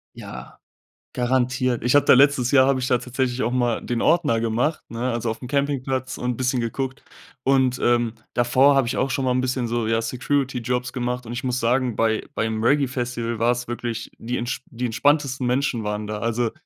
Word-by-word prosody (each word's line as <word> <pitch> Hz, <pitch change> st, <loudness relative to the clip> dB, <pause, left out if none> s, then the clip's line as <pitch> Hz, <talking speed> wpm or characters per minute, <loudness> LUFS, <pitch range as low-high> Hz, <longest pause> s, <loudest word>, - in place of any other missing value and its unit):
Ja, -, -, -10 dB, 0.5 s
garantiert. 125 Hz, -1 st, 0 dB
Ich 125 Hz, +3 st, +2 dB
habe 145 Hz, -, +5 dB
da -, -, +7 dB
letztes 135 Hz, -2 st, +4 dB
Jahr 130 Hz, -2 st, +6 dB
habe 135 Hz, -1 st, +2 dB
ich 125 Hz, -, -2 dB
da 125 Hz, -, +3 dB
tatsächlich 125 Hz, 0 st, -2 dB
auch 115 Hz, -, 0 dB
mal 120 Hz, -2 st, 0 dB
den 120 Hz, -1 st, -2 dB
Ordner 145 Hz, -10 st, +2 dB
gemacht, 120 Hz, +7 st, 0 dB
ne, 120 Hz, +2 st, -2 dB
also, 115 Hz, -1 st, -2 dB
aufm 115 Hz, +3 st, -5 dB
Campingplatz 135 Hz, -2 st, -1 dB
und 125 Hz, -1 st, -2 dB
bisschen 130 Hz, 0 st, 0 dB
geguckt. 130 Hz, +3 st, -3 dB, 0.4 s
Und, 130 Hz, -2 st, +2 dB
ähm, 120 Hz, -2 st, +2 dB, 0.2 s
davor 130 Hz, +4 st, +4 dB
habe 135 Hz, -3 st, +2 dB
ich 125 Hz, -, -2 dB
auch 135 Hz, -, +1 dB
schon 135 Hz, 0 st, -1 dB
mal 130 Hz, -, +2 dB
'n 125 Hz, -, +1 dB
bisschen 125 Hz, -1 st, -1 dB
so, 115 Hz, -1 st, -1 dB
ja, 115 Hz, 0 st, +1 dB
Security-Jobs 125 Hz, 0 st, -1 dB
gemacht 125 Hz, -1 st, -3 dB
und 115 Hz, -, -7 dB
ich 120 Hz, +1 st, -4 dB
muss 125 Hz, 0 st, 0 dB
sagen 125 Hz, 0 st, +1 dB
bei 110 Hz, -1 st, +1 dB
beim 110 Hz, 0 st, -1 dB
Reggae 140 Hz, +3 st, +3 dB
Festival 120 Hz, -2 st, -3 dB
war 115 Hz, +2 st, +3 dB
es 120 Hz, 0 st, -3 dB
wirklich 120 Hz, -2 st, -4 dB
die 120 Hz, +2 st, -3 dB
entsp 120 Hz, +1 st, -3 dB
die 125 Hz, +1 st, -5 dB
entspanntesten 135 Hz, +1 st, +1 dB
Menschen 125 Hz, -3 st, 0 dB
waren 105 Hz, 0 st, -3 dB
da. 105 Hz, 0 st, -4 dB
Also, 115 Hz, 0 st, -1 dB
125 Hz, 200 wpm, -23 LUFS, 120-130 Hz, 0.5 s, da